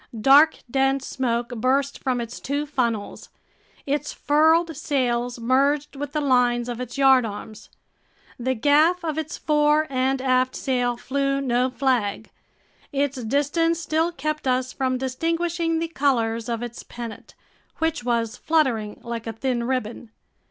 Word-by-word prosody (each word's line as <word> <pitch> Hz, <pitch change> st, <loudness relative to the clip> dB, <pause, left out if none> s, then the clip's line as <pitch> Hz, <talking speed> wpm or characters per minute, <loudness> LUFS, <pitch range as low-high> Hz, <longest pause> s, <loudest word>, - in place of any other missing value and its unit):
Dark, 285 Hz, +7 st, +5 dB
dense 270 Hz, +1 st, +1 dB
smoke 240 Hz, -2 st, -2 dB
burst 260 Hz, +4 st, 0 dB
from 255 Hz, -2 st, -1 dB
its 235 Hz, 0 st, -6 dB
two 285 Hz, +2 st, -2 dB
funnels. 235 Hz, -8 st, -2 dB, 0.6 s
Its 290 Hz, +1 st, -1 dB
furled 320 Hz, +3 st, +2 dB
sails 245 Hz, -5 st, -1 dB
merged 275 Hz, +5 st, +1 dB
with 285 Hz, 0 st, -5 dB
the 305 Hz, -, 0 dB
lines 245 Hz, -3 st, +2 dB
of 245 Hz, 0 st, -4 dB
its 250 Hz, +2 st, -6 dB
yardarms. 230 Hz, -5 st, +1 dB, 0.7 s
The 260 Hz, +2 st, -1 dB
gaff 305 Hz, +8 st, +3 dB
of 315 Hz, -1 st, -2 dB
its 315 Hz, -1 st, -5 dB
fore 300 Hz, 0 st, +2 dB
and 260 Hz, +1 st, +1 dB
aft 255 Hz, 0 st, +1 dB
sail 245 Hz, -3 st, -1 dB
flew 275 Hz, +2 st, -1 dB
no 255 Hz, -1 st, +1 dB
flag. 250 Hz, -6 st, -1 dB, 0.6 s
Its 280 Hz, -2 st, -1 dB
distance 290 Hz, +7 st, +1 dB
still 325 Hz, +1 st, 0 dB
kept 305 Hz, -1 st, -3 dB
us 255 Hz, 0 st, 0 dB
from 260 Hz, -1 st, -1 dB
distinguishing 330 Hz, +5 st, -1 dB
the 330 Hz, +1 st, -1 dB
colors 230 Hz, -7 st, 0 dB
of 230 Hz, 0 st, -2 dB
its 240 Hz, 0 st, -7 dB
pennant, 235 Hz, -3 st, -9 dB, 0.4 s
which 320 Hz, -5 st, -1 dB
was 230 Hz, -2 st, -1 dB
fluttering 255 Hz, -10 st, 0 dB
like 235 Hz, -1 st, -5 dB
a 225 Hz, -, -3 dB
thin 240 Hz, +1 st, -2 dB
ribbon. 240 Hz, -2 st, -3 dB
265 Hz, 140 wpm, -23 LUFS, 240-295 Hz, 0.7 s, Dark